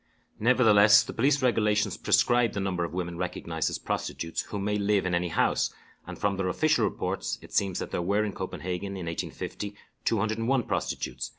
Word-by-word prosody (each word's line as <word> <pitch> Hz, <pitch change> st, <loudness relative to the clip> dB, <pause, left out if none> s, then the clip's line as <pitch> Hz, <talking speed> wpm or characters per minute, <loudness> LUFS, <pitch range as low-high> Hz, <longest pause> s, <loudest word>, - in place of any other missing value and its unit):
Nevertheless, 110 Hz, -3 st, +6 dB
the -, -, -7 dB
police 135 Hz, +3 st, +2 dB
regulations 105 Hz, -4 st, +2 dB
prescribe 120 Hz, -2 st, +3 dB
the 100 Hz, -, -2 dB
number 95 Hz, -3 st, -1 dB
of 85 Hz, -, -3 dB
women 85 Hz, -1 st, -4 dB
recognized 85 Hz, -2 st, -2 dB
as -, -, -3 dB
prostitutes 80 Hz, 0 st, -3 dB
who 105 Hz, -, -6 dB
may 105 Hz, +1 st, -1 dB
live 100 Hz, -1 st, +1 dB
in 90 Hz, -, -1 dB
any 90 Hz, 0 st, +1 dB
house, 85 Hz, -, +1 dB, 0.4 s
and -, -, -7 dB
from 100 Hz, -1 st, 0 dB
their 95 Hz, -1 st, -1 dB
official 155 Hz, +11 st, +2 dB
reports, -, -, -2 dB
it -, -, -14 dB
seems 95 Hz, -3 st, +1 dB
that -, -, -4 dB
there -, -, -1 dB
were 100 Hz, +4 st, +1 dB
in 105 Hz, -, -4 dB
Copenhagen 95 Hz, +1 st, -4 dB
in 90 Hz, -, -5 dB
1850 100 Hz, +4 st, -5 dB, 0.3 s
201 115 Hz, +4 st, +1 dB
prostitutes. -, -, -3 dB
100 Hz, 180 wpm, -28 LUFS, 90-110 Hz, 0.4 s, Nevertheless